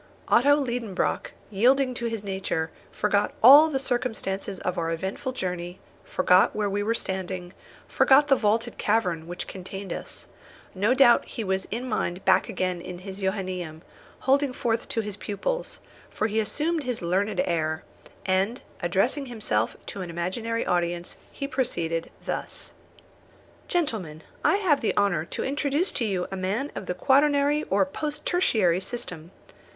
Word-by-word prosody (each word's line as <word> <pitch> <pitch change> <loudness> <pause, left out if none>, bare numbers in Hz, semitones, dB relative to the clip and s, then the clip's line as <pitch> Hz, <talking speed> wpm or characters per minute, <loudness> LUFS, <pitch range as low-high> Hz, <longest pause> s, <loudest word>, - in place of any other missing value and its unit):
Otto 285 +4 +6
Liedenbrock, 240 -8 -1 0.2
yielding 255 +6 +3
to 240 -1 -2
his 225 -3 -4
nature, 190 -5 -2 0.2
forgot 205 0 +1
all 290 +6 +10
the 280 - 0
circumstances 225 -7 -2
of 180 - -1
our 165 -2 -1
eventful 190 - -3
journey, 180 -5 -4 0.2
forgot 180 +1 +3
where 210 -2 0
we 205 +1 0
were 225 +3 0
standing, 185 -3 -3 0.3
forgot 280 +2 +5
the 275 - +5
vaulted 225 +1 0
cavern 180 -7 +1
which 175 +1 -5
contained 190 +1 -6
us. - - -6 0.5
No 205 +7 +2
doubt 260 -3 +6
he 230 - -5
was 190 -1 -1
in 240 +4 -4
mind 190 -5 -2
back - - +4
again 185 -2 -2
in 180 +1 -7
his 190 +2 -8
Johannæum, 185 -4 -3 0.4
holding 275 0 +2
forth 230 -2 -1
to 225 - 0
his 210 -2 -5
pupils, - - -3 0.3
for - - -2
he 220 0 +1
assumed 305 +9 0
his 250 -7 -3
learned 190 +3 0
air; 155 -2 -1 0.4
and 195 +5 +1 0.2
addressing 240 +11 +1
himself 205 - -1
to 195 - -6
an 180 - -5
imaginary 190 +7 -2
audience, 175 0 -1
he 275 - -4
proceeded 170 -12 -1 0.2
thus: - - -4 1.0
"Gentlemen, 205 - -2 0.2
I - - +4
have 360 -9 +2
the 225 - 0
honour 175 -6 +2
to - - -4
introduce 290 +5 +1
to 235 - -1
you 190 -4 -1
a - - -3
man 200 +10 -2
of 190 - -6
the 180 - -2
quaternary 285 +5 +3
or 195 0 +3
post 300 +10 -5
tertiary 210 - +2
system. 185 -6 -6
205 Hz, 155 wpm, -26 LUFS, 180-255 Hz, 1.0 s, all